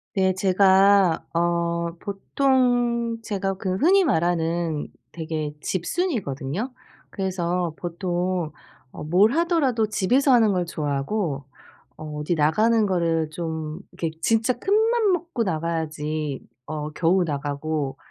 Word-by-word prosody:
네 190 -1 +2
제가 190 -1 +4
어 170 0 0
보통 240 +2 +1
제가 195 -3 -2
그 185 -1 -2
흔히 375 - +4
말하는 170 - 0 0.2
되게 155 -2 -4
집순이거든요. 185 - -2 0.4
그래서 180 -3 -2
보통 175 -1 -2 0.4
어 - - -8
뭘 185 +8 +4
하더라도 295 -8 +2
집에서 250 +7 +2
하는 225 -4 +4
걸 180 -2 0
좋아하고 145 0 -2 0.5
어 - - -9 0.2
어디 150 +4 0
나가는 215 +9 +3
거를 165 -5 0
좀 160 0 -5
이렇게 165 - -3
진짜 225 +6 +2
큰맘 440 +1 +2
먹고 335 -8 -2
나가야지 155 -4 -3 0.2
어 150 0 -4
겨우 175 +4 +2
나가고 145 -1 -3
180 Hz, 235 characters per minute, -24 LUFS, 160-220 Hz, 0.5 s, 제가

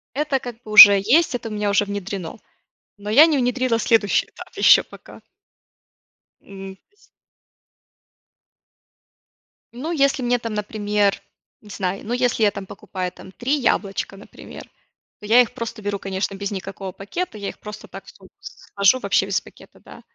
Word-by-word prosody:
Это 290 -1 -1
как 245 -3 -8
бы 215 - -11
уже 205 -1 +10
есть, 255 - +2
это 235 -2 -5
у - - -10
меня 210 -1 -2
уже 200 +1 +2
внедрено, 200 -1 -6 0.6
но 205 0 -8
я 275 +9 +7
не 315 -3 +1
внедрила 250 -1 0
следующий 220 -3 +1
этап - - -13
еще - - +6
пока. - - -15 1.2
М. 195 -1 -11
Сь 395 - -42 2.8
Ну 275 +8 -5
если 275 -4 +1
мне 245 0 +1
там, 230 -2 -6
например, 205 -1 -1 0.4
не 210 - -17
знаю, 195 -1 -3
я, - - -14
ну, 230 - -4
если 245 -2 0
я 205 - +4
там 200 -1 -8
покупаю, 185 -1 -6
там, 190 - -14
3 250 +8 -2
яблочка, 200 -5 -1
например, 200 - -12 0.6
то - - -12
я 230 +4 +6
их 245 -1 -2
просто 230 -3 -7
беру, 205 -1 -3
конечно, 195 0 -4
без 200 +1 -5
никакого 195 -1 -7
пакета, 220 - -6
я 200 - -5
их - - -12
просто 210 0 -10
так - - -11
в - - -14
сумку - - -19
сложу 255 - 0
Вообще - - +1
без - - -1
пакета, - - -18
да. - - -14
210 Hz, 170 wpm, -21 LUFS, 200-245 Hz, 2.8 s, уже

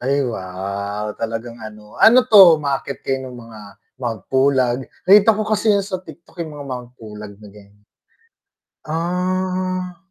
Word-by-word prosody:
Ay 140 +3 0
wow, 100 +2 -5
talagang 115 +1 -5
ano. 105 -1 -12
Ano 245 +3 +7
'to, 200 -8 +8
umaakyat 140 -2 -3
kayo 135 0 -1
ng 125 - -9
mga 115 -2 -12 0.4
Mount 115 -5 -4
Pulag, 130 -2 +1 0.2
nakita 205 +3 +6
ko 215 - -2
kasi 215 0 +1
‘yan 200 - +1
sa 190 -1 -4
TikTok, 180 -1 -16
yung 160 -3 -5
mga 145 -1 -8
Mount 125 -1 -6
Pulag 105 -3 -10
na 105 - -12
ganiyan. 100 0 -19 1.0
Ah. 185 +2 -2
135 Hz, 150 wpm, -19 LUFS, 110-185 Hz, 1.0 s, to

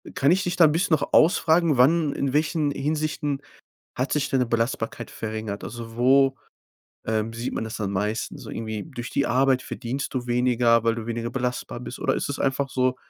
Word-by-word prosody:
Kann 140 +4 +3
ich 190 +2 +2
dich 180 0 -1
da 170 - +7
'n 150 - +4
bisschen 165 0 +2
noch 145 - -4
ausfragen, 165 -3 +4
wann 145 +3 +4
in 135 -2 -2
welchen 150 0 +1
Hinsichten 150 -1 -2 0.6
hat 130 +2 -1
sich 145 -1 +1
deine 130 -2 +2
Belastbarkeit 115 0 -2
verringert? 110 -2 -5
Also, 115 0 -8
wo, 135 +2 +4 0.7
ähm, 110 0 -1
sieht 115 +2 -4
man - - -2
das 110 - -6
am 100 - -2
meisten? 105 +3 -2
So - - -10
irgendwie 110 -2 -4
durch 120 -6 -7
die 140 - 0
Arbeit 130 +1 +3
verdienst 130 +3 -5
du 125 -2 -3
weniger, 120 -1 +3
weil 115 0 +2
du 115 - -5
weniger 115 0 -3
belastbar 125 -2 -3
bist 125 - -7
oder - - +1
ist - - -2
es 140 - -4
einfach 135 0 0
so 130 -1 +1
130 Hz, 195 wpm, -24 LUFS, 115-145 Hz, 0.7 s, da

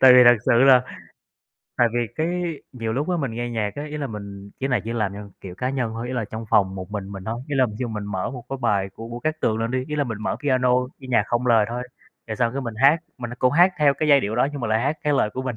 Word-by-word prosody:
tại 130 -1 +9
vì 125 -1 +8
thật 120 0 +8
sự 130 - +5
là 130 -2 +7 0.9
tại 120 -1 +4
vì 120 -1 +1
cái 170 -1 -2
nhiều 115 -3 -3
lúc 145 +8 -1
á, 180 - +1
mình 140 -7 -2
nghe 120 +1 -3
nhạc 110 -3 -2
á, 145 - -5
ý 150 0 -6
là 145 -2 -2
mình 100 -3 -8
chỉ 135 - -1
là 125 -4 +1
chỉ 115 - -3
làm 105 -4 -1
theo, 100 0 -9
kiểu, 90 -2 -8
cá 125 +6 -2
nhân 125 -4 -1
thôi, 115 +2 -4
ý 130 - -4
là 115 -3 -1
trong 110 +2 -7
phòng 95 -2 +3
một 95 +1 -7
mình 100 -2 -4
mình 95 -1 -8
thôi, 115 +2 -3
ý 145 - -2
là 130 -1 +4
ví 105 - -8
dụ 125 -2 -2
mình 105 -2 -4
mở 100 -1 -3
một 125 -2 -8
cái 135 - -4
bài 100 -4 +1
của 115 +1 -8
Vũ 120 +1 -7
Cát 155 0 -2
Tường 110 0 +1
lên 115 +1 -1
đi, 130 0 -1
ý 150 - -3
là 145 - +1
mình 110 -4 -5
mở - - -1
piano, 130 -3 +2 0.3
cái 130 - -10
nhạc 120 -4 +3
không 120 +1 -1
lời 115 -3 +4
thôi, 120 +1 -3 0.4
rồi 110 - -4
xong 115 +1 +1
cái 140 - -3
mình 115 -4 -5
hát, 150 +4 +6 0.2
mình 120 -2 -5
cũng 130 +1 +3
hát 175 +4 +5
theo 145 -2 +4
cái 155 - -1
giai 140 -2 +7
điệu 105 0 -2
đó 130 +3 +3
nhưng 145 - -5
mà 115 - -2
lại 110 +1 +2
hát 145 +5 -1
cái 150 - +2
lời 110 -6 +2
của 130 - -3
mình, 125 -3 -3
120 Hz, 310 wpm, -23 LUFS, 110-135 Hz, 0.9 s, tại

